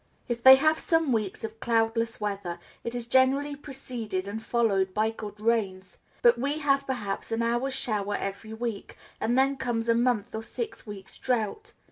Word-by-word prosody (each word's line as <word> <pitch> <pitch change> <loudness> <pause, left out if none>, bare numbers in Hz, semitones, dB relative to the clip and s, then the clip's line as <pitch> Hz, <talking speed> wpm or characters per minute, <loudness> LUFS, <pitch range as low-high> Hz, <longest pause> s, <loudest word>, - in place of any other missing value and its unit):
If 235 -1 -2
they 265 +2 +11
have 310 +3 +3
some 325 -4 +1
weeks 215 -4 -1
of 220 0 -6
cloudless 230 0 +1
weather, 200 -4 -3 0.3
it 235 +1 -4
is 240 -1 -4
generally 265 +4 +3
preceded 245 -9 -5
and 215 +2 -4
followed 200 -5 +1
by 215 +1 +2
good 210 -2 -8
rains; 205 -5 -1 0.2
but 235 0 +6
we 285 +4 0
have 275 -2 +1
perhaps 215 -6 -3
an 225 +1 0
hour's 240 +3 0
shower 210 -6 -1
every 200 +3 -5
week, 225 -2 -5 0.2
and 240 +3 +1
then 270 +1 +3
comes 240 -3 -2
a 230 - +5
month 240 -2 +1
or 220 - -3
six 425 - -6
weeks' 200 -2 -10
drought. 255 - -2
230 Hz, 175 wpm, -27 LUFS, 210-260 Hz, 0.3 s, they